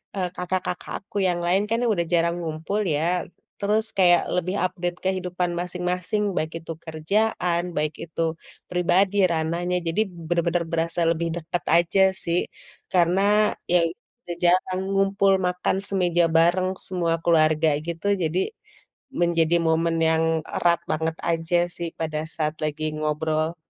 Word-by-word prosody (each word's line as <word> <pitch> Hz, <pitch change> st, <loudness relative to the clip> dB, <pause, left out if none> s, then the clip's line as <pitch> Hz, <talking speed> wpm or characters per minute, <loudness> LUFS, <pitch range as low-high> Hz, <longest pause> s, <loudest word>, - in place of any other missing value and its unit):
eee, 180 Hz, -2 st, -1 dB
kakak-kakak 180 Hz, 0 st, -3 dB
aku 205 Hz, -, -8 dB
yang 175 Hz, -1 st, 0 dB
lain 190 Hz, +4 st, +2 dB
kan 230 Hz, +1 st, +1 dB
udah 170 Hz, -3 st, -1 dB
jarang 170 Hz, 0 st, +2 dB
ngumpul 165 Hz, +6 st, -2 dB
ya. 170 Hz, +3 st, 0 dB, 0.3 s
Terus 215 Hz, +2 st, +1 dB
kayak 175 Hz, -2 st, +6 dB
lebih 185 Hz, +2 st, -1 dB
update 175 Hz, -1 st, -3 dB
kehidupan 180 Hz, -2 st, -1 dB
masing-masing, 180 Hz, +3 st, -2 dB
baik 155 Hz, +1 st, -1 dB
itu 165 Hz, -, -6 dB
kerjaan, 175 Hz, +2 st, 0 dB
baik 150 Hz, 0 st, 0 dB
itu 165 Hz, 0 st, -5 dB, 0.5 s
pribadi 185 Hz, +3 st, +2 dB
ranahnya. 170 Hz, +3 st, -1 dB
Jadi 165 Hz, +6 st, +1 dB, 0.3 s
benar-benar 170 Hz, 0 st, +1 dB
berasa 165 Hz, +1 st, -1 dB
lebih 170 Hz, 0 st, -1 dB
deket 170 Hz, +1 st, -4 dB
aja 175 Hz, +3 st, +3 dB, 0.2 s
sih, 170 Hz, +1 st, +1 dB, 0.5 s
karena 180 Hz, +2 st, +3 dB, 0.5 s
ya 175 Hz, -, +6 dB, 0.4 s
udah 175 Hz, -1 st, -5 dB
jarang 185 Hz, +1 st, +2 dB
ngumpul 195 Hz, 0 st, +3 dB
makan 180 Hz, +1 st, 0 dB
semeja 175 Hz, -3 st, +2 dB
bareng 180 Hz, +3 st, +3 dB, 0.2 s
semua 175 Hz, -3 st, 0 dB
keluarga 155 Hz, -1 st, +4 dB, 0.2 s
gitu. 170 Hz, +4 st, -4 dB, 0.2 s
Jadi 165 Hz, +4 st, 0 dB, 0.8 s
menjadi 170 Hz, -1 st, +3 dB
momen 165 Hz, +1 st, +2 dB
yang 160 Hz, 0 st, +2 dB, 0.3 s
erat 170 Hz, -1 st, +3 dB
banget 160 Hz, +1 st, -1 dB
aja 165 Hz, +1 st, +1 dB, 0.2 s
sih 170 Hz, -1 st, -4 dB
pada 155 Hz, -1 st, -2 dB, 0.2 s
saat 155 Hz, 0 st, -1 dB
lagi 155 Hz, 0 st, -2 dB
ngobrol. 155 Hz, +2 st, -1 dB
175 Hz, 135 wpm, -24 LUFS, 165-180 Hz, 0.8 s, kayak